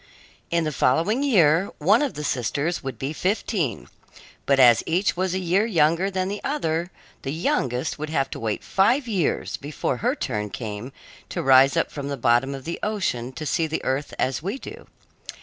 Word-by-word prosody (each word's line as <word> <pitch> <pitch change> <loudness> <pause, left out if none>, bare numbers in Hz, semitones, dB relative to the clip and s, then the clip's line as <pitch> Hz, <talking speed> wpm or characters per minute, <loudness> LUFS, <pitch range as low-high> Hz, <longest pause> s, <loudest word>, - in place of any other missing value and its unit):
In 170 0 +1
the 155 - -1
following 165 - +2
year, 185 - +4
one 200 - +4
of 290 -3 -1
the 150 - -5
sisters 145 +6 -1
would 135 -2 -6
be 135 +3 -3
fifteen, 185 - -1 0.6
but 140 -1 +3
as 120 -3 +7
each 180 +5 +1
was 185 0 -1
a - - +1
year 185 +3 +2
younger 170 -1 +2
than 185 -1 -1
the 205 +1 -5
other, 170 - -1 0.3
the 135 - -5
youngest 130 -4 -1
would 155 0 -4
have 135 -4 0
to - - -5
wait 110 -2 -2
five 240 +8 +2
years 195 -8 -1
before 145 +2 -3
her 245 +5 0
turn 105 - -3
came 105 +4 -6 0.4
to - - -3
rise 135 +3 +6
up 165 - +1
from 140 -2 -5
the 140 -1 -3
bottom 120 +3 +2
of 135 - -8
the 170 - -5
ocean 175 - -2
to 155 - -6
see 160 +2 0
the 160 - -4
earth 135 +2 -1
as 130 +2 -1
we 195 - -3
do. - - -10
160 Hz, 190 wpm, -24 LUFS, 135-190 Hz, 0.6 s, as